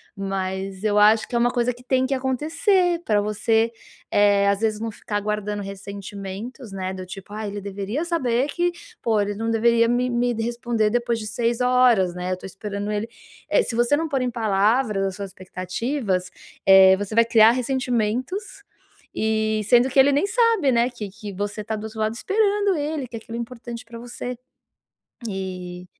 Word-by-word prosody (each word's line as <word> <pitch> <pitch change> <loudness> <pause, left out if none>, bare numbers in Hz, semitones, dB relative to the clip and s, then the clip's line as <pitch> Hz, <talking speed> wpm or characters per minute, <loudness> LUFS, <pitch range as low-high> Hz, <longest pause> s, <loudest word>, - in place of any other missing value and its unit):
Mas 195 0 -4
eu 210 -1 +2
acho 215 +1 +5
que 245 - -5
é - - +4
uma 240 +1 +3
coisa 245 0 0
que 245 +1 -17
tem 260 0 +1
que 275 - -1
acontecer 330 - +1
para 210 -2 +2
você, 220 +2 +1 0.4
eh, 200 -1 +4
às 200 0 +2
vezes, 215 -1 0
não 225 +1 -3
ficar 205 0 -4
aguardando 210 0 -2
ressentimentos, 200 +4 -7
né. 190 -1 -4
Do 185 -1 -7
tipo: 195 +2 -10
"Ah, 215 0 -4
ele 205 0 -5
deveria 200 - -3
saber 265 -7 0
que, 350 +3 0 0.3
pô, 225 -2 +1
ele 205 0 -2
não 225 +2 -2
deveria 230 +1 +3
me 245 +1 +1
me 245 0 +1 0.2
responder 235 -2 0
depois 235 0 0
de 215 - -6
6 235 +2 -1
horas, 250 -7 +4
né. 180 - -6
Eu 185 - -1
tô - - -11
esperando 200 +2 -5
ele". 210 +1 -2 0.4
Eh, - - +4
se 235 - -4
você 240 +5 +3
não 325 +1 -1
pôr 270 -3 0
em 250 -1 -1
palavras 215 0 +1
as 190 -1 -3
suas 200 -1 -6
expectativas, 185 +2 -3 0.4
eh, 190 0 +8
você 205 +1 -5
vai 230 - +6
criar 225 -1 +6
ressentimentos, 255 - -1 0.8
e 220 0 +1
sendo 245 +1 +5
que 270 +1 +2
ele 280 +2 +6
nem 290 +9 +2
sabe, 450 - +4
né, 235 +1 +3
que 240 -4 -7
que 210 -2 -7
você 205 +1 -3
tá 220 +1 -3
do 215 0 -6
outro 220 0 -8
lado 215 0 0
esperando 410 -1 +2
ele, 295 -3 -3
que, 235 - -9
eh, - - -6
aquilo 230 +1 -8
é - - -2
importante 235 0 -9
pra 230 0 -10
você. 245 0 -6 0.9
E 180 -2 -6
225 Hz, 190 wpm, -23 LUFS, 200-250 Hz, 0.9 s, eh